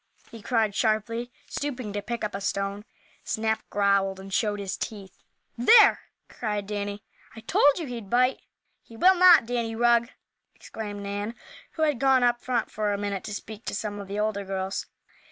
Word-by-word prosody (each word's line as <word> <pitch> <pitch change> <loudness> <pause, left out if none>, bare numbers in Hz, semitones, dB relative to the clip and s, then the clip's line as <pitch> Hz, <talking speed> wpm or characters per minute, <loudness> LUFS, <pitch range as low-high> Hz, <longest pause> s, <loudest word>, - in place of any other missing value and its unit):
he 230 -2 -10
cried, 220 -2 +1
sharply, 230 +3 -1 0.2
stooping 255 -7 -4
to 205 - -2
pick 235 +3 -5
up 210 - -2
a 195 - -4
stone. 200 +1 -2 0.4
Snap 220 0 -1
growled 200 -1 +1
and 195 0 -9
showed 210 -1 0
his 195 -2 -3
teeth. 200 -4 -7 0.4
"There!" 415 - +7 0.3
cried 210 -3 -3
Danny. 205 0 -4 0.3
"I 225 - -9
told 285 +5 +3
you 335 - -3
he'd 235 -6 -7
bite." 250 +3 +2 0.4
"He 230 - -15
will 370 +9 +6
not, 355 -7 +7
Danny 230 -1 -2
Rugg!" 235 0 +3 0.5
exclaimed 205 -2 -7
Nan, 205 +3 -4 0.4
who 315 - -1
had 295 -6 +1
gone 265 -1 +4
up 240 0 +2
front 245 -3 -1
for 210 -1 -1
a 200 - -1
minute 200 -1 -3
to 210 - -5
speak 220 +2 -9
to - - -3
some 205 0 -4
of 200 - -8
the 200 +1 -5
older 210 -1 -1
girls. 190 0 -4
215 Hz, 180 wpm, -26 LUFS, 200-240 Hz, 0.5 s, There